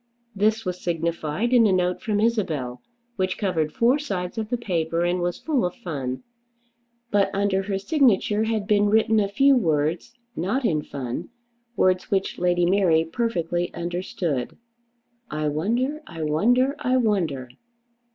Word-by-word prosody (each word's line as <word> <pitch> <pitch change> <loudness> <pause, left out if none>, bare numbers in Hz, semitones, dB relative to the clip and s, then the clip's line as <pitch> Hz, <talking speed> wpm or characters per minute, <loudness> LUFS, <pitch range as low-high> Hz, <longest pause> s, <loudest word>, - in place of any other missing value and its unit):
This 215 +2 +1
was 180 0 -4
signified 170 +5 -1
in 235 -3 +6
a - - +2
note 180 -1 +1
from 210 -2 -1
Isabel, 160 - -1 0.4
which 185 -1 -1
covered 165 -7 0
four 245 - +3
sides 195 -7 -4
of 215 -1 -4
the 245 - 0
paper 170 -6 -1
and 175 +1 0
was 175 0 -1
full 295 -6 0
of 180 0 -2
fun. 140 - -5 0.9
But 205 -1 +3
under 200 -1 +1
her 195 0 -2
signature 215 -2 +2
had 220 -2 -1
been 205 -1 +3
written 220 +1 +3
a 200 - +2
few 270 +8 +4
words, 160 - 0 0.2
not 215 +11 -1
in 155 -8 +1
fun, 140 +3 -5 0.5
words 185 -3 +2
which 195 -1 -1
Lady 175 0 +2
Mary 175 -3 +3
perfectly 175 -3 -1
understood. 170 -6 -3 0.7
"I 150 0 -1
wonder, 240 - -1
I 165 -2 -6
wonder, 245 - +2
I 255 +1 +1
wonder!" 175 - 0
185 Hz, 150 wpm, -24 LUFS, 165-220 Hz, 0.9 s, in